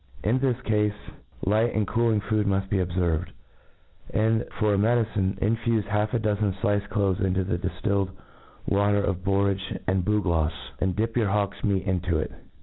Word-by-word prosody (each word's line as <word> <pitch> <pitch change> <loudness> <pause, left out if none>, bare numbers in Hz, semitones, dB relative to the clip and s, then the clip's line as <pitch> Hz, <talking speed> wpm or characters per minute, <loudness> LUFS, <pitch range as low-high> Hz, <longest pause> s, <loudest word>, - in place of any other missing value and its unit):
In 115 +5 +2
this 130 -2 +1
cafe 105 -1 +2
j 105 - -8 0.5
light 110 +4 +2
and 110 -1 +2
cooling 115 -1 +2
food 105 +1 0
muft 95 0 0
be 100 - +1
obferved; 90 -1 0 0.8
and, 110 +1 +2
for 105 -2 +2
a - - +2
medicine, 110 -3 +1
infufe 115 +1 +1
half 105 +2 0
a - - +4
dozen 105 -3 0
diced 105 +1 0
doves 100 -3 +1
into 95 -2 +1
the 95 0 -2
diftilled 95 +2 -1 0.6
water 100 0 +2
of 95 -2 -2
borage 100 -1 0
and 95 -1 +1
bu 105 +1 +1
glofs, 80 -2 -1
and 95 -1 0
dip 115 +2 -1
your 115 -4 +2
hawk's 100 -1 -1
meat 95 -3 +1
into 90 -3 0
it. 75 - -2
100 Hz, 175 wpm, -26 LUFS, 95-110 Hz, 0.8 s, a